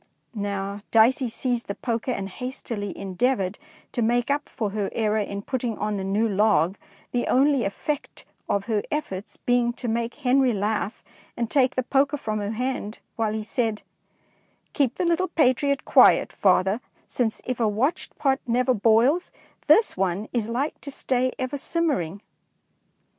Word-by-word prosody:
Now 200 Hz, -1 st, -3 dB
Dicey 235 Hz, +3 st, +4 dB
seized 240 Hz, +1 st, -2 dB
the 200 Hz, -, -3 dB
poker 235 Hz, 0 st, -3 dB
and 195 Hz, -6 st, -2 dB
hastily 220 Hz, -2 st, -5 dB
endeavoured 195 Hz, +1 st, -1 dB, 0.3 s
to 240 Hz, -, -2 dB
make 240 Hz, +3 st, +1 dB
up 290 Hz, +1 st, -1 dB
for 215 Hz, -3 st, -3 dB
her 205 Hz, -1 st, -2 dB
error 215 Hz, -1 st, +1 dB
in 200 Hz, -1 st, -4 dB
putting 245 Hz, -3 st, -2 dB
on 210 Hz, 0 st, -2 dB
the 190 Hz, -, -3 dB
new 200 Hz, +4 st, +1 dB
log, 200 Hz, -4 st, +2 dB, 0.4 s
the 245 Hz, -, -1 dB
only 270 Hz, -2 st, +3 dB
effect 280 Hz, +8 st, -4 dB, 0.2 s
of 200 Hz, -1 st, 0 dB
her 220 Hz, -3 st, 0 dB
efforts 210 Hz, -10 st, -4 dB
being 245 Hz, -1 st, +1 dB
to 245 Hz, -, -6 dB
make 230 Hz, +1 st, -1 dB
Henry 255 Hz, -1 st, +3 dB
laugh 210 Hz, +1 st, -2 dB, 0.3 s
and 235 Hz, -1 st, -2 dB
take 260 Hz, -3 st, +3 dB
the 255 Hz, -, +1 dB
poker 275 Hz, +3 st, +2 dB
from 215 Hz, -5 st, -3 dB
her 205 Hz, +1 st, -3 dB
hand, 245 Hz, -2 st, -3 dB, 0.2 s
while 220 Hz, -2 st, 0 dB
he 220 Hz, 0 st, -3 dB
said, 225 Hz, -1 st, -1 dB, 0.3 s
— -, -, -39 dB
" -, -, -42 dB
Keep 270 Hz, -4 st, +1 dB
the 360 Hz, -, -1 dB
little 340 Hz, +2 st, +2 dB
patriot 280 Hz, -3 st, +2 dB
quiet, -, -, +5 dB
father, 190 Hz, +3 st, +2 dB, 0.2 s
since, 230 Hz, -3 st, -1 dB
if 255 Hz, -1 st, -3 dB
a 225 Hz, -, +3 dB
watched 230 Hz, +10 st, -1 dB
pot 270 Hz, -1 st, +2 dB
never 250 Hz, +2 st, +2 dB
boils, 235 Hz, -, +3 dB, 0.4 s
this 445 Hz, -, +5 dB
one 190 Hz, +2 st, -1 dB
is 230 Hz, -3 st, -1 dB
like 270 Hz, +6 st, -2 dB
to 280 Hz, -, -7 dB
stay 255 Hz, -2 st, 0 dB
ever 265 Hz, +2 st, -3 dB
simmering." 265 Hz, -, -1 dB
235 Hz, 165 wpm, -25 LUFS, 205-260 Hz, 0.4 s, quiet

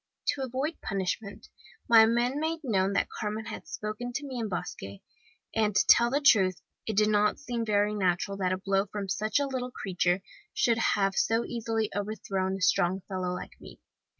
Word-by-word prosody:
"To 280 Hz, -, 0 dB
avoid 265 Hz, +5 st, -3 dB
punishment, 200 Hz, +1 st, -3 dB, 0.4 s
my 225 Hz, -1 st, +8 dB
men 240 Hz, +4 st, +1 dB
made 320 Hz, +1 st, -2 dB
known 195 Hz, -6 st, +1 dB
that -, -, +1 dB
Carmen 215 Hz, +1 st, -4 dB
had 225 Hz, -, -8 dB
spoken 215 Hz, +3 st, -5 dB
to 285 Hz, -, -3 dB
me 260 Hz, -3 st, -5 dB
in 220 Hz, -2 st, -2 dB
Basque; 180 Hz, -, -4 dB, 0.7 s
and 215 Hz, -2 st, +1 dB
to 195 Hz, -, +4 dB
tell 235 Hz, 0 st, +6 dB
the 280 Hz, +3 st, +1 dB
truth, 200 Hz, -, +4 dB, 0.3 s
it 215 Hz, -3 st, -2 dB
did 210 Hz, 0 st, +4 dB
not 210 Hz, 0 st, +2 dB
seem 240 Hz, -5 st, -3 dB
very 210 Hz, -1 st, +1 dB
natural 195 Hz, 0 st, 0 dB
that 185 Hz, -2 st, 0 dB
a 185 Hz, -, 0 dB
blow 195 Hz, +1 st, 0 dB
from 200 Hz, 0 st, -5 dB
such 215 Hz, +6 st, 0 dB
a 285 Hz, -, +1 dB
little 260 Hz, -2 st, -3 dB
creature 180 Hz, -4 st, -1 dB, 0.3 s
should 230 Hz, -1 st, +2 dB
have 195 Hz, -3 st, +2 dB
so 225 Hz, +1 st, +1 dB
easily 225 Hz, -2 st, -2 dB
overthrown 195 Hz, -2 st, -2 dB
a 195 Hz, -, -7 dB
strong 185 Hz, 0 st, +2 dB
fellow 185 Hz, -2 st, -2 dB
like -, -, -9 dB
me. -, -, -13 dB
215 Hz, 185 wpm, -28 LUFS, 195-235 Hz, 0.7 s, my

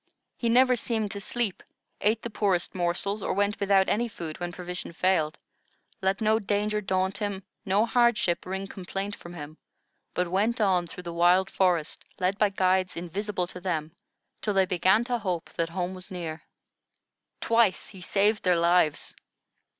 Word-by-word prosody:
He 235 Hz, -, -1 dB
never 250 Hz, +2 st, +5 dB
seemed 220 Hz, -3 st, -1 dB
to 200 Hz, -1 st, -5 dB
sleep, 225 Hz, -2 st, -2 dB, 0.4 s
ate 220 Hz, +2 st, +2 dB
the 235 Hz, -, -4 dB
poorest 195 Hz, -5 st, +1 dB
morsels, 185 Hz, +3 st, -1 dB
or -, -, -1 dB
went 205 Hz, +2 st, 0 dB
without 195 Hz, -1 st, +3 dB
any 235 Hz, +3 st, +1 dB
food 165 Hz, -8 st, -7 dB
when 175 Hz, 0 st, -3 dB
provision 180 Hz, -1 st, -6 dB
failed; 165 Hz, -3 st, +1 dB, 0.6 s
let 195 Hz, +3 st, 0 dB
no 220 Hz, 0 st, +3 dB
danger 210 Hz, 0 st, 0 dB
daunt 190 Hz, 0 st, 0 dB
him, 200 Hz, -2 st, -3 dB, 0.2 s
no 200 Hz, +4 st, +3 dB
hardship 235 Hz, -7 st, +2 dB
wring 190 Hz, +1 st, -3 dB
complaint 195 Hz, +1 st, -5 dB
from 175 Hz, 0 st, -11 dB
him, 155 Hz, -1 st, -9 dB, 0.6 s
but 180 Hz, -1 st, 0 dB
went 215 Hz, +6 st, +1 dB
on 185 Hz, -4 st, +2 dB
through 180 Hz, -, -9 dB
the 170 Hz, -1 st, -6 dB
wild 180 Hz, +3 st, +4 dB
forest, 175 Hz, -5 st, +1 dB
led 185 Hz, +2 st, 0 dB
by 210 Hz, -, +4 dB
guides 185 Hz, -1 st, +1 dB
invisible 185 Hz, +2 st, -2 dB
to 180 Hz, 0 st, -10 dB
them, 165 Hz, -4 st, -2 dB, 0.5 s
till 210 Hz, -2 st, -1 dB
they 190 Hz, -1 st, +5 dB
began 185 Hz, +5 st, +3 dB
to 245 Hz, -1 st, -1 dB
hope 180 Hz, -6 st, -3 dB
that 165 Hz, -1 st, -2 dB
home 180 Hz, +1 st, -3 dB
was 185 Hz, 0 st, -7 dB
near. 170 Hz, -3 st, -5 dB, 1.0 s
Twice 230 Hz, -4 st, +2 dB
he 190 Hz, -3 st, -12 dB
saved 205 Hz, +3 st, +2 dB
their 180 Hz, -2 st, +3 dB
lives. 170 Hz, -2 st, +2 dB
190 Hz, 165 wpm, -27 LUFS, 175-210 Hz, 1.0 s, never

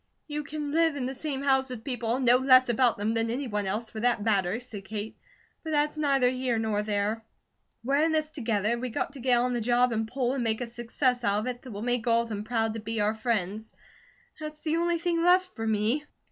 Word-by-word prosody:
"You 300 Hz, -1 st, -3 dB
can 295 Hz, 0 st, -5 dB
live 325 Hz, -1 st, +3 dB
in 265 Hz, -3 st, -2 dB
the 260 Hz, -, -3 dB
same 275 Hz, 0 st, -4 dB
house 265 Hz, -1 st, +2 dB
with 245 Hz, -3 st, -7 dB
people 240 Hz, -3 st, -1 dB
and 260 Hz, 0 st, -1 dB
know 245 Hz, +1 st, +7 dB
less 255 Hz, -1 st, +5 dB
about 240 Hz, 0 st, +3 dB
them 210 Hz, +2 st, -1 dB
than 225 Hz, 0 st, 0 dB
any 260 Hz, +5 st, -2 dB
one 205 Hz, -3 st, -2 dB
else, 215 Hz, +4 st, -2 dB
for 220 Hz, -, -6 dB
that 235 Hz, -2 st, +1 dB
matter," 200 Hz, -1 st, +1 dB
said 225 Hz, -5 st, -9 dB
Kate, 215 Hz, +1 st, -5 dB, 0.5 s
"but 320 Hz, -, -5 dB
that's 300 Hz, 0 st, +1 dB
neither 275 Hz, -4 st, +2 dB
here 255 Hz, -2 st, -1 dB
nor 220 Hz, -2 st, 0 dB
there. 210 Hz, +1 st, -1 dB, 0.6 s
We're 275 Hz, +4 st, +2 dB
in 320 Hz, +1 st, +3 dB
this 310 Hz, -1 st, 0 dB
together, 230 Hz, -5 st, 0 dB
we 250 Hz, +1 st, -3 dB
got 275 Hz, +3 st, -3 dB
to 280 Hz, -, -10 dB
get 250 Hz, -1 st, +3 dB
on 250 Hz, +1 st, +1 dB
the 240 Hz, -, -1 dB
job 245 Hz, +2 st, +3 dB
and 220 Hz, 0 st, -1 dB
pull, 250 Hz, +1 st, -1 dB
and 265 Hz, -3 st, -1 dB
make 220 Hz, -1 st, 0 dB
a 245 Hz, -, -2 dB
success 240 Hz, +2 st, -1 dB
out 205 Hz, -1 st, +2 dB
of -, -, -5 dB
it 245 Hz, -1 st, -4 dB
that 255 Hz, -, -10 dB
will 205 Hz, +1 st, -6 dB
make 245 Hz, 0 st, -1 dB
all 230 Hz, 0 st, +4 dB
of 230 Hz, -, -10 dB
them 210 Hz, -2 st, -4 dB
proud 225 Hz, -1 st, 0 dB
to 225 Hz, -, -5 dB
be 225 Hz, +1 st, -3 dB
our 210 Hz, +1 st, +2 dB
friends. 220 Hz, -2 st, -2 dB, 0.7 s
That's 305 Hz, 0 st, -7 dB
the 320 Hz, +1 st, 0 dB
only 340 Hz, 0 st, +1 dB
thing 335 Hz, 0 st, 0 dB
left 365 Hz, +1 st, +4 dB
for 225 Hz, 0 st, -3 dB
me. 220 Hz, +7 st, +1 dB
245 Hz, 245 wpm, -28 LUFS, 220-275 Hz, 0.7 s, know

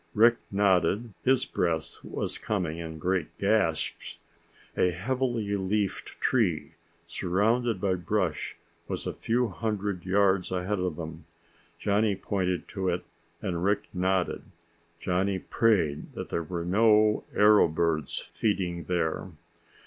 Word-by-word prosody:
Rick 115 Hz, +2 st, +6 dB
nodded. 100 Hz, +2 st, +2 dB
His 130 Hz, 0 st, +3 dB
breath 80 Hz, -3 st, -1 dB
was -, -, -4 dB
coming 85 Hz, -6 st, -2 dB
in 80 Hz, -1 st, -6 dB
great 90 Hz, +1 st, -1 dB
gasps. -, -, 0 dB, 0.6 s
A 90 Hz, -, +3 dB
heavily 115 Hz, +2 st, -1 dB
leafed 100 Hz, +1 st, -2 dB
tree 100 Hz, -12 st, +1 dB, 0.3 s
surrounded 110 Hz, +4 st, +1 dB
by 95 Hz, 0 st, +1 dB
brush 90 Hz, -2 st, -1 dB, 0.3 s
was -, -, -4 dB
a -, -, -2 dB
few 120 Hz, +1 st, 0 dB
hundred 100 Hz, 0 st, -2 dB
yards 95 Hz, 0 st, +2 dB
ahead 95 Hz, +2 st, -1 dB
of 90 Hz, -3 st, -1 dB
them. 80 Hz, -1 st, -7 dB, 0.5 s
Johnny 105 Hz, 0 st, +2 dB
pointed 95 Hz, -2 st, -2 dB
to 95 Hz, -2 st, -1 dB
it 90 Hz, 0 st, -1 dB, 0.4 s
and 85 Hz, -2 st, -2 dB
Rick 100 Hz, +1 st, +1 dB
nodded. 95 Hz, 0 st, 0 dB, 0.6 s
Johnny 95 Hz, +2 st, 0 dB
prayed 90 Hz, -7 st, +1 dB
that -, -, -6 dB
there 85 Hz, -, -1 dB
were 85 Hz, +1 st, -4 dB
no 105 Hz, +2 st, +4 dB
arrow 105 Hz, -1 st, +6 dB
birds 80 Hz, -1 st, -1 dB
feeding 90 Hz, -6 st, -2 dB
there. 85 Hz, -2 st, -1 dB
95 Hz, 125 wpm, -28 LUFS, 85-105 Hz, 0.6 s, Rick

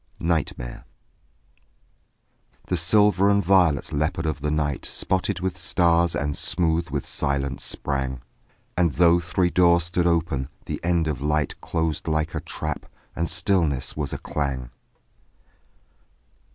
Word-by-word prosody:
NIGHTMARE 80 Hz, -7 st, -2 dB, 1.9 s
The 90 Hz, -, +1 dB
silver 100 Hz, +3 st, +4 dB
and 100 Hz, -2 st, +2 dB
violet 85 Hz, -7 st, +3 dB
leopard 75 Hz, +3 st, -1 dB
of 80 Hz, -2 st, -2 dB
the 75 Hz, -, -1 dB
night 75 Hz, -2 st, -1 dB
Spotted 95 Hz, 0 st, -1 dB
with 95 Hz, -1 st, -2 dB
stars 85 Hz, -3 st, +2 dB
and 75 Hz, 0 st, -1 dB
smooth 85 Hz, -1 st, +1 dB
with 70 Hz, -1 st, -3 dB
silence 70 Hz, -1 st, -1 dB
sprang; 65 Hz, -2 st, -2 dB, 0.5 s
And 85 Hz, -4 st, +2 dB
though 85 Hz, -1 st, +5 dB
three 90 Hz, +1 st, 0 dB
doors 85 Hz, -1 st, +4 dB
stood 85 Hz, +1 st, 0 dB
open, 80 Hz, -6 st, 0 dB, 0.2 s
the -, -, -4 dB
end 85 Hz, -2 st, +1 dB
of 75 Hz, -5 st, -3 dB
light 75 Hz, 0 st, -1 dB
Closed 80 Hz, -1 st, -2 dB
like 80 Hz, 0 st, 0 dB
a -, -, -2 dB
trap; 75 Hz, -2 st, -5 dB, 0.3 s
and 85 Hz, +1 st, -1 dB
stillness 80 Hz, -10 st, 0 dB
was 75 Hz, -2 st, -3 dB
a -, -, -3 dB
clang. 65 Hz, -4 st, -3 dB
80 Hz, 130 wpm, -24 LUFS, 75-85 Hz, 1.9 s, though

